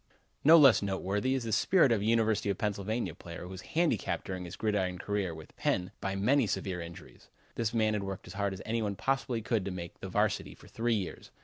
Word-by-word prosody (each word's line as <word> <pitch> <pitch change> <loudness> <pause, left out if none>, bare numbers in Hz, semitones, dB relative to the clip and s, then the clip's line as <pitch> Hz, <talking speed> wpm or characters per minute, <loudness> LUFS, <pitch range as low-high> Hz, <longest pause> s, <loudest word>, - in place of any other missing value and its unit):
No 160 +3 +9
less 135 -7 +7
noteworthy 100 +5 0
is 130 - -2
the 115 - -3
spirit 165 - +4
of 110 -3 +2
a - - -2
University 110 -2 +2
of 100 - 0
Pennsylvania 105 +2 -2
player, 85 0 -9
who 90 - -8
was 95 -1 -7 0.2
handicapped 165 - +1
during 95 -1 -4
his 85 - -7
gridiron 100 -4 0
career 100 -1 -2
with 80 -1 -12
Penn' 90 +1 0
by 95 0 -2
many 125 +5 +3
severe 95 -2 -2
injuries. 85 0 -11 0.3
This 115 -2 -1
man 110 -2 +2
had 105 - -1
worked 95 -1 -5
as 90 - -9
hard 100 0 -1
as 95 - -9
any 115 +1 -1
one 105 -2 -1
possibly 130 -1 -1
could 110 -3 0
to - - -2
make 90 -2 -7
the - - -6
varsity - - 0
for - - -17
three 115 0 0
years. 95 -4 -5
105 Hz, 225 wpm, -31 LUFS, 95-115 Hz, 0.3 s, No